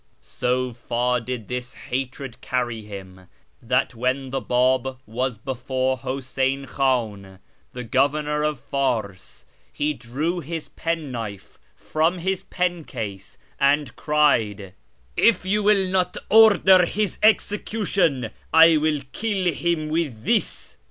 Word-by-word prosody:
So 125 0 -2
far 120 +1 0
did 120 -2 -5
this 125 0 -5
hatred 130 0 -5
carry 120 -3 -2
him, 95 -3 -10 0.3
that 125 +2 +1
when 130 +2 -1
the 135 0 -2
B;ib 130 +1 +1
was 125 +2 -2
before 130 +2 -2
Huseyn 135 +1 -2
Khan, 110 -8 -1 0.4
the 125 - -5
Governor 145 +5 +1
of 150 -3 -1
Fars, 110 - -3 0.3
he 150 +1 -1
drew 150 +8 -3
his 165 0 -6
penknife 125 - -5 0.2
from 160 +4 0
his 190 +2 -1
pen 180 -3 -2
case, 100 -8 -7 0.2
and 145 +1 +2
cried, 110 -11 +1 0.2
' 65 - -39
If 230 -4 +3
yon 205 +2 +1
will 200 -2 +4
not 185 -1 0
order 205 -4 +7
his 210 +1 -2
execution, 200 - +1 0.2
I 160 0 +7
will 150 -1 +1
kill 195 -6 -1
him 160 0 -1
with 155 -9 -2
this.' 225 +3 -1
135 Hz, 125 wpm, -23 LUFS, 120-165 Hz, 0.4 s, order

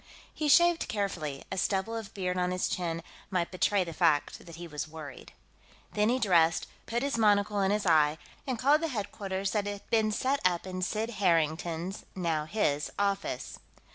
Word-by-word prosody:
He 305 - -2
shaved 345 +3 +5
carefully; 175 -9 -3
a 190 - -1
stubble 195 +4 0
of 225 -3 -6
beard 180 -2 -1
on 180 0 +1
his 185 0 0
chin 165 -2 -2 0.3
might 180 -3 -1
betray 195 +1 +2
the 165 -2 -7
fact 155 -3 +1
that 165 - -9
he 170 +1 -8
was 150 -1 -4
worried. 155 -4 -10 0.6
Then 210 +1 +2
he 250 - +2
dressed, 170 -8 +3 0.2
put 235 +2 -1
his 280 -4 -1
monocle 205 -1 +3
in 190 - +2
his 210 0 0
eye, 155 -3 +4 0.3
and 255 -3 -1
called 285 +6 +4
the 330 - 0
headquarters 200 -5 -3
that 205 -2 0
had 205 -1 -6
been 220 -1 +3
set 265 +6 0
up 180 -1 +1
in 185 -1 -5
Sid 220 +5 -1
Harrington's 170 +1 0
now 165 -4 -1
his 150 -5 0
office. 200 -1 -2
190 Hz, 180 wpm, -30 LUFS, 170-215 Hz, 0.6 s, shaved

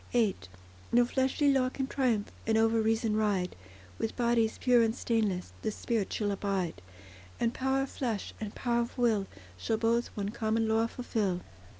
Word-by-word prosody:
VIII 225 -5 +3 0.6
No 240 +1 +5
fleshly 265 +3 +2
law 255 -1 +2
can 265 +1 -3
triumph, 245 -6 0 0.2
And 220 0 +3
over 225 0 +3
reason 220 0 +1
ride; 205 -4 0 0.4
With 225 - -2
bodies 235 -2 +2
pure 245 -2 +4
and 225 0 +2
stainless 215 -8 -1
The 220 - -1
spirit 215 -1 -2
shall 205 -2 0
abide; 190 - -2 0.6
And 235 0 +1
power 265 +1 +1
of 270 - -6
flesh, 230 -7 -3
and 210 -2 -5
power 235 -1 +1
of 235 - -5
will, 220 -5 +2 0.3
Shall 225 - 0
both 230 +1 +2
one 200 -1 -2
common 220 +1 0
law 225 +1 +2
fulfil. 210 -7 -2
225 Hz, 170 wpm, -30 LUFS, 210-240 Hz, 0.6 s, No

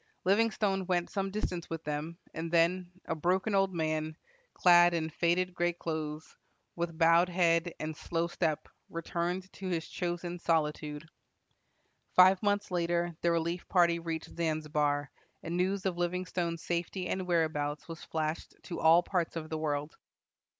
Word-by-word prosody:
Livingstone 200 -2 +2
went 175 -2 0
some 195 -1 -1
distance 185 -4 -3
with 165 -1 -4
them, 150 +3 -4 0.2
and 165 +1 -4
then, 175 +2 +3 0.2
a - - -1
broken 185 +6 0
old 195 -1 +3
man, 155 -2 -2 0.4
"clad 175 -1 +6
in 160 -1 -1
faded 175 +3 +1
gray 175 0 +1
clothes," 155 -2 -5 0.4
with 170 -1 -3
bowed 170 +2 +5
head 170 -1 +2
and 155 0 -4
slow 165 +2 -1
step, 165 -3 -1 0.2
returned 175 +3 -3
to 190 - -6
his 170 -3 -2
chosen 175 0 -3
solitude. 150 -1 -1 1.1
Five 185 +1 +7
months 205 -2 0
later 175 -1 0
the 170 - +2
relief 170 +1 -1
party 170 -2 +3
reached 165 -1 -5
Zanzibar, 150 -3 0 0.3
and 165 +1 -3
news 185 +2 0
of 180 -2 -1
Livingstone's 175 -1 -2
safety 175 +2 -2
and 185 -1 -2
whereabouts 155 -4 0
was 165 -1 -8
flashed 155 0 -3
to 175 - -5
all 165 +2 +6
parts 175 -3 -1
of 155 -1 -5
the 160 - -1
world. 150 -1 -2
170 Hz, 150 wpm, -31 LUFS, 160-180 Hz, 1.1 s, Five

